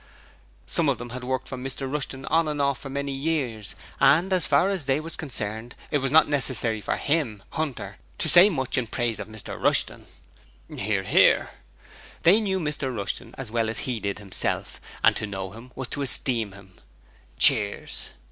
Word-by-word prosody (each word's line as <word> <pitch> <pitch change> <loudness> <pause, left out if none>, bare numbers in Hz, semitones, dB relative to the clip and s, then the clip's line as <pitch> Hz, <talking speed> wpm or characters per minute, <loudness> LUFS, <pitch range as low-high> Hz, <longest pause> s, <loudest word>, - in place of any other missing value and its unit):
Some - - +1
of - - +1
them 120 0 -8
had 125 +1 -6
worked 130 0 -2
for 130 - -6
Mr 135 +2 -5
Rushton 135 -1 -4
on 165 0 +2
and 150 -1 -3
off 140 -2 +1
for 135 - -8
many 140 +1 -3
years, 135 - -2 0.2
and 175 +7 +4
as 180 -3 +1
far 145 +6 +4
as 190 -7 -2
THEY 135 +1 +1
was 165 +1 -6
concerned 110 -4 -4 0.2
it 145 - +2
was 135 0 -1
not 155 +4 +6
necessary 125 -6 0
for - - -2
him 140 -10 -1
(Hunter) 155 -5 -4 0.2
to - - -1
say 180 +4 +7
much 130 -7 -1
in 120 - -3
praise 115 -1 -1
of 105 - -6
Mr 110 -1 -8
Rushton. - - +1 0.7
(Hear, 100 -1 -1
hear.) - - +4 0.7
They 195 +7 +6
knew 190 -3 -1
Mr 150 -4 -2
Rushton 105 +4 -5
as 130 -5 -6
well 115 -1 0
as 110 - -1
he 125 -3 -1
did 100 -1 -3
himself 100 -2 -3 0.2
and - - +5
to 105 - -3
know 95 -2 -5
him 115 +4 -12
was 130 -2 -4
to 145 - -2
esteem 120 -6 +3
him. 95 -1 -15 0.6
(Cheers.) 100 -2 +4
130 Hz, 185 wpm, -25 LUFS, 110-145 Hz, 0.7 s, say